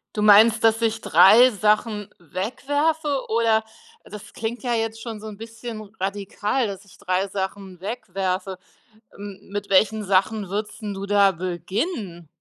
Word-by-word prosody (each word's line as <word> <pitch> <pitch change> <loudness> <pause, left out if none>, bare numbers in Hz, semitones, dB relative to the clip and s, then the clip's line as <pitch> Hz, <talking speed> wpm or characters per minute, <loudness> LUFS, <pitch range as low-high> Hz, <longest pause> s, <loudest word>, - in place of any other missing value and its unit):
Du 210 - -1
meinst, 215 +2 +6
dass 225 +1 +3
ich 225 -1 0
3 240 +7 +6
Sachen 210 0 0
wegwerfe, 285 - -2
oder? 225 -1 +2 0.4
Das 210 -1 -11
klingt 230 +2 -4
ja 245 -2 -1
jetzt 225 0 -2
schon 225 -3 -7
so 220 - -8
'n 205 -2 -9
bisschen 225 0 -8 0.2
radikal, 205 +5 -2
dass 195 0 -7
ich 200 - -19
3 185 +2 -1
Sachen 190 -1 -5
wegwerfe. 190 -2 -3 0.6
M 200 -1 -10
mit 205 0 -5
welchen 210 +2 +3
Sachen 195 +2 +1
würdest 210 +2 -4
'n 205 -2 -4
du 195 +1 -6
da 200 -1 +4
beginnen? 185 - -4
210 Hz, 150 wpm, -23 LUFS, 195-225 Hz, 0.6 s, meinst